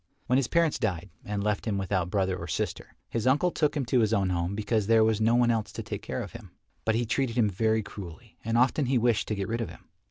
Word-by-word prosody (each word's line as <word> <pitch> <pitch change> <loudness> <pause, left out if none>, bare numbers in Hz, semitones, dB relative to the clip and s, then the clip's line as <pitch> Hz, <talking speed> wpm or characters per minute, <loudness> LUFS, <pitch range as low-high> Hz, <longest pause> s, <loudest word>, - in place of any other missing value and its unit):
When 125 - +2
his 135 -3 +1
parents 170 -3 +2
died 95 -5 -2
and 105 -3 -3
left 105 +1 -1
him 105 -3 0
without 95 -2 -1
brother 95 -1 0
or 85 -2 -6
sister, 80 - -3
his 115 +1 -2
uncle 145 +7 +3
took 150 -2 0
him 135 - -1
to 125 +1 +2
his 110 -1 +2
own 95 -3 +2
home 85 +2 -1
because 110 0 0
there 115 -1 +5
was 110 -1 +2
no 115 +2 +4
one 120 -1 +4
else 110 -2 -1
to - - -5
take - - -5
care - - -4
of - - -9
him. - - -11 0.4
But 110 - +2
he 120 +1 +1
treated 125 0 -1
him 110 -4 +3
very 110 +3 +1
cruelly 100 +4 -10
and 115 +1 0
often 130 +3 +3
he 130 0 +2
wished 120 -2 +2
to 105 - -1
get 100 -1 -3
rid 115 +3 -2
of 115 - -3
him. - - -14
110 Hz, 265 wpm, -28 LUFS, 100-120 Hz, 0.4 s, there